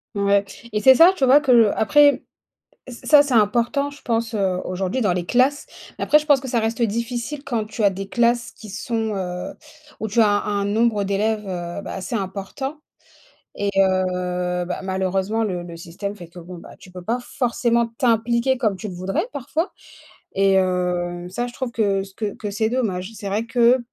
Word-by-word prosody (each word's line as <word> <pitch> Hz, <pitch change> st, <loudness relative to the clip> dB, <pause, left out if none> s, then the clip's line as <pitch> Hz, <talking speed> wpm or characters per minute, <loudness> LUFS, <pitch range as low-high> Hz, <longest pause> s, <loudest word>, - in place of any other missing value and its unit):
Ouais 200 Hz, 0 st, +2 dB, 0.3 s
et 210 Hz, -, 0 dB
c'est 265 Hz, -1 st, +8 dB
ça, 335 Hz, +6 st, +8 dB
tu 275 Hz, -, +1 dB
vois, 270 Hz, +3 st, +6 dB
que 275 Hz, -3 st, +1 dB
le 230 Hz, -4 st, +5 dB
après, 290 Hz, +6 st, +4 dB, 0.7 s
ç 255 Hz, -, -7 dB
ça 295 Hz, -2 st, +7 dB
c'est 275 Hz, -3 st, -2 dB
important 240 Hz, +6 st, +2 dB
je 285 Hz, -, -14 dB
pense, 230 Hz, -1 st, -1 dB
heu, 190 Hz, -3 st, 0 dB
aujourd'hui 185 Hz, +6 st, -2 dB
dans 205 Hz, -6 st, +2 dB
les 175 Hz, -1 st, -2 dB
classes, 260 Hz, +6 st, +2 dB, 0.3 s
mais -, -, -1 dB
après 300 Hz, -, +5 dB
je 300 Hz, -, -9 dB
pense 290 Hz, -3 st, +5 dB
que 265 Hz, -, -7 dB
ça 240 Hz, -2 st, +1 dB
reste 225 Hz, +2 st, -2 dB
difficile 235 Hz, +5 st, -2 dB
quand 235 Hz, -5 st, -2 dB
tu 215 Hz, +1 st, -5 dB
as 200 Hz, -, +5 dB
des 195 Hz, +1 st, -6 dB
classes 240 Hz, +2 st, +1 dB
qui 215 Hz, -, -13 dB
sont, 220 Hz, +1 st, -3 dB
heu, 180 Hz, -1 st, -4 dB, 0.5 s
où 220 Hz, -, -2 dB
tu 225 Hz, +3 st, +1 dB
as 220 Hz, -, +5 dB
un 205 Hz, 0 st, 0 dB
un -, -, -1 dB
nombre 215 Hz, +1 st, +1 dB
d'élèves, 210 Hz, +2 st, 0 dB
heu, 175 Hz, +1 st, -5 dB
bah, -, -, -7 dB
assez 190 Hz, +5 st, -5 dB
important 205 Hz, +9 st, -4 dB, 0.8 s
et 205 Hz, 0 st, -1 dB
heu, 180 Hz, -2 st, 0 dB
bah, 180 Hz, -, -4 dB
malheureusement 190 Hz, +3 st, -1 dB
le 185 Hz, -4 st, -2 dB
le 170 Hz, -1 st, -9 dB
système 190 Hz, +5 st, -6 dB
fait 175 Hz, -4 st, -11 dB
que 170 Hz, +2 st, -13 dB
bon, 175 Hz, +1 st, -10 dB
bah, -, -, -13 dB
tu -, -, -15 dB
peux 180 Hz, -1 st, -9 dB
pas 235 Hz, +6 st, -1 dB
forcément 235 Hz, -1 st, 0 dB
t'impliquer 235 Hz, +2 st, +2 dB
comme 215 Hz, -5 st, 0 dB
tu 215 Hz, +3 st, -7 dB
le 185 Hz, -, -7 dB
voudrais 185 Hz, -, -2 dB
parfois 310 Hz, +7 st, -3 dB, 0.6 s
et 195 Hz, 0 st, +3 dB
heu, 180 Hz, -1 st, -1 dB
ça 240 Hz, +6 st, -3 dB
je -, -, -8 dB
trouve 260 Hz, -2 st, -4 dB
que 200 Hz, -3 st, +1 dB
c 195 Hz, -, -13 dB
que 210 Hz, -2 st, -3 dB
que 205 Hz, -2 st, -5 dB
c'est 220 Hz, +2 st, 0 dB
dommage. 215 Hz, -6 st, -2 dB
C'est 205 Hz, -1 st, -7 dB
vrai 210 Hz, +3 st, -1 dB
que, 240 Hz, +2 st, +4 dB
210 Hz, 205 wpm, -22 LUFS, 190-240 Hz, 0.8 s, c'est